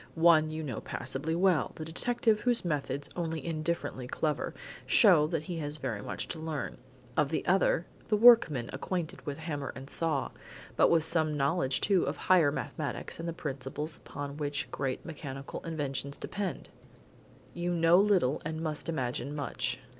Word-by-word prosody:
One 160 -2 +5
you 155 0 -4
know 130 -7 -4
passably 155 +5 -3
well 180 -3 +2
the 155 - -6
detective 220 +6 +1
whose 240 -3 +1
methods, 145 -3 -2
only 165 -3 -3
indifferently 155 -5 -2
clever 150 +3 -1 0.3
show 175 -10 +6
that 160 -2 -2
he 170 +1 -4
has 145 0 -4
very 120 -8 -3
much - - -4
to 165 - -5
learn. 160 -2 -4 0.4
Of 150 -2 +2
the 160 - -2
other 180 -2 +3 0.2
the 210 - +2
workman 210 - +6
acquainted 165 +4 -3
with 145 - -3
hammer 150 -4 -4
and 135 0 -8
saw, 160 -5 0 0.4
but - - +5
with 165 -2 +4
some 160 -2 +1
knowledge 135 -2 +1
too 195 -3 +3
of 140 +1 -2
higher 170 -6 +4
mathematics 150 0 -4
and 170 +1 -3
the - - -3
principles 145 0 -4
upon 145 0 -7
which 145 -1 -2
great 135 -2 -3
mechanical 140 -4 -6
inventions 140 -3 -3
depend, 195 -3 -4 0.8
you 175 +1 -2
know 170 +1 +5
little, 190 -10 +3
and 160 0 -3
must 155 -1 -3
imagine 130 -2 -2
much. 145 -2 -2
155 Hz, 160 wpm, -30 LUFS, 140-170 Hz, 0.8 s, show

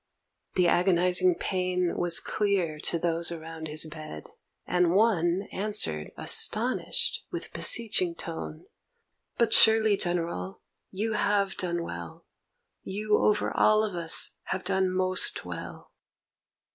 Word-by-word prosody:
The 180 -2 +2
agonizing 180 0 +2
pain 180 -1 -2
Was 175 -1 +3
clear 190 -7 -2
to 170 - -1
those 170 0 -1
around 160 -1 -8
his 155 +1 0
bed, 155 - -10 0.4
and 180 -1 0
one 190 -4 +1
Answered, 195 - +1
astonished, 255 - +2
with - - -7
beseeching 200 -7 +2
tone: 160 -1 -8 0.7
'But 230 -2 +1
surely, 220 -1 +6
General, 165 - -3 0.3
you 215 +3 -4
have 200 -2 -1
done 175 -2 -3
well, 85 - -9 0.6
You 210 +2 -2
over 210 0 0
all 215 0 +3
of 210 -4 -4
us 165 -1 +2
have 190 - -4
done 190 0 -1
most 185 0 +1
well.' - - -9
180 Hz, 120 wpm, -26 LUFS, 170-205 Hz, 0.7 s, surely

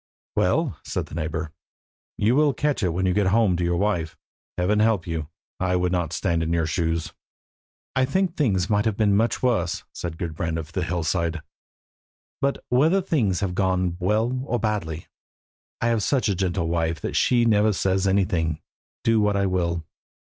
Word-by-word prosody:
"Well," - - +1
said - - -3
the - - -15
neighbour, 80 0 -3 0.7
"you 110 +4 +2
will 145 -2 +3
catch 150 +1 0
it 95 - +2
when 90 +3 -1
you 90 - +2
get 105 -1 +2
home 100 -2 +3
to 90 - -1
your 85 0 +1
wife. 85 -5 -1 0.4
Heaven 95 +4 +2
help 110 -5 +2
you! 80 -3 -3 0.3
I 90 0 +1
would 90 0 +1
not 85 -3 -1
stand 85 +2 0
in 80 0 -1
your 85 -1 +1
shoes." 80 -1 -1 0.8
"I 130 - +3
think 185 +5 0
things 95 - +1
might 105 +1 +1
have 110 -3 0
been 105 -3 +3
much 115 +5 +1
worse," 100 -9 +1
said 85 -2 -5
Gudbrand 80 -1 -3
of 80 0 -6
the 95 - -2
Hillside; 85 0 -1 1.0
"but 140 0 -1
whether 155 +10 +4
things 130 - 0
have 95 -3 -1
gone 95 -2 +1
well 110 +7 +1
or 120 - 0
badly, 100 -8 -2 0.8
I 115 - +2
have 115 -2 +1
such 130 +4 +1
a 100 - +2
gentle 90 -2 -1
wife 80 -1 0
that - - -4
she 120 -2 +3
never 110 -1 +4
says 95 0 +1
anything, 90 -5 +1 0.4
do 115 -1 +3
what 105 -1 +2
I 100 - +2
will." 85 -3 -1
95 Hz, 180 wpm, -24 LUFS, 85-110 Hz, 1.0 s, whether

